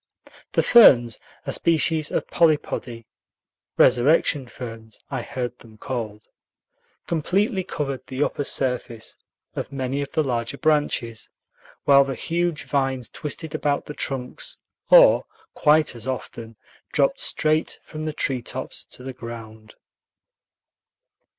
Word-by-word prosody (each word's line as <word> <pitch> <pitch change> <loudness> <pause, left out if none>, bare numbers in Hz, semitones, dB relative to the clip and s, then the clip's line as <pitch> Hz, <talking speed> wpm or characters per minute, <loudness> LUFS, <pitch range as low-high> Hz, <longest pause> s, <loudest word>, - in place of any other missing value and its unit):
The - - +3
ferns, 120 - +6 0.3
a - - -2
species 160 -2 +1
of - - -1
polypody 145 -7 0 0.7
("resurrection 140 +1 +4
ferns," 115 -3 -9
I - - -2
heard 125 -1 -5
them 110 -2 -16
called), 110 -5 -5 0.8
completely 190 - 0
covered 140 -6 -4
the 130 +2 -1
upper 145 - -2
surface 125 -4 -3 0.4
of - - -4
many 135 0 -2
of 140 - -5
the 155 - +2
larger 120 0 -2
branches, 145 -8 0 0.5
while 140 0 +6
the 135 -1 -4
huge 170 +3 -1
vines 135 -4 -1
twisted 150 +1 -6
about 145 -1 0
the 150 - -7
trunks, 130 -3 -4 0.3
or, - - +7 0.3
quite 155 +1 +3
as 120 +2 -8
often, 115 -3 -5 0.4
dropped - - +2
straight 155 +1 +1
from 155 0 -6
the 155 - -3
treetops 130 -5 -3
to 125 - -11
the 130 0 -6
ground. 110 -2 -10
135 Hz, 120 wpm, -23 LUFS, 120-155 Hz, 0.8 s, or